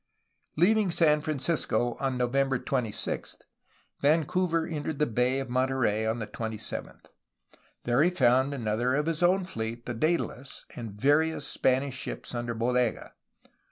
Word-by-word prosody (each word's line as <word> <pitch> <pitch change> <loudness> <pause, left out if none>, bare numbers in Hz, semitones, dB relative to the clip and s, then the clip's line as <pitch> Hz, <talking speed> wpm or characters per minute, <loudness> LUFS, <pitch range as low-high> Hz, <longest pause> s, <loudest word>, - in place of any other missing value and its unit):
Leaving 205 +4 +4
San 150 -3 +3
Francisco 140 -6 0
on 135 -2 -1
November 135 +2 +1
26, 125 -4 -2 0.6
Vancouver 165 +3 +2
en 155 -3 -4
tered 155 0 -3
the 150 - +2
Bay 125 +2 +1
of 135 - -4
Monterey 125 -4 +1
on 110 +1 0
the 110 - -4
27th. 110 0 -5 0.8
Here 120 +3 +3
he 170 - +5
found 130 -4 +3
another 120 -1 0
of 150 +1 0
his 165 0 -1
own 185 +2 +3
fleet, 115 -6 -5
the 120 - -3
Daedalus, 140 -1 -2
and 115 -3 -6
various 145 +9 +1
Spanish 130 +1 +1
ships - - -5
under 120 -1 -3
Bodega. 120 +1 0
130 Hz, 140 wpm, -28 LUFS, 120-155 Hz, 0.8 s, he